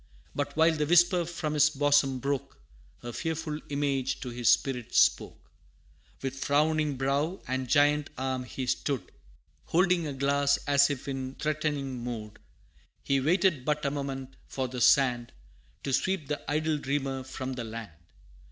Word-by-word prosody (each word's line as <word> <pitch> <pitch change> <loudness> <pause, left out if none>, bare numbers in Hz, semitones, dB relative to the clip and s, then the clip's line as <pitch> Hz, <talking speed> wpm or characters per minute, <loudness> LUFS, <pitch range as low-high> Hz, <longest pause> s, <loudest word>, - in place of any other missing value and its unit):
But 145 +1 -3
while 160 +1 +5
the 150 -1 -1
whisper 175 +1 +4
from 160 -2 -3
his 150 0 +5
bosom 145 -2 +2
broke, 140 +1 -3 0.4
A 120 0 -6
fearful 160 0 -3
Image 140 -2 -1
to 125 - -5
his 120 -2 +1
spirit 125 -4 +1
spoke: - - +2 0.7
With 135 0 -3
frowning 150 0 +1
brow, 140 +7 0
and 130 0 -2
giant 145 0 +3
arm 130 -1 -2
he 130 +1 -5
stood, 135 +1 -2 0.5
Holding 180 -1 +2
a 145 - -4
glass, 140 +1 +2
as 140 0 +4
if 140 -2 -4
in 135 -1 -4
threatening 145 -4 -2
mood, 110 -3 -6 0.6
He 135 0 +2
waited 170 -1 +2
but 150 +1 -1
a 140 - +1
moment 135 -2 -5
for 130 -1 -3
the 125 0 -5
sand, 120 -3 +3 0.5
To 135 - -2
sweep 185 0 0
the 150 - -2
idle 155 +1 0
Dreamer 135 -1 -2
from 130 0 -5
the 125 -2 -5
land! 115 -3 -7
140 Hz, 150 wpm, -28 LUFS, 130-150 Hz, 0.7 s, while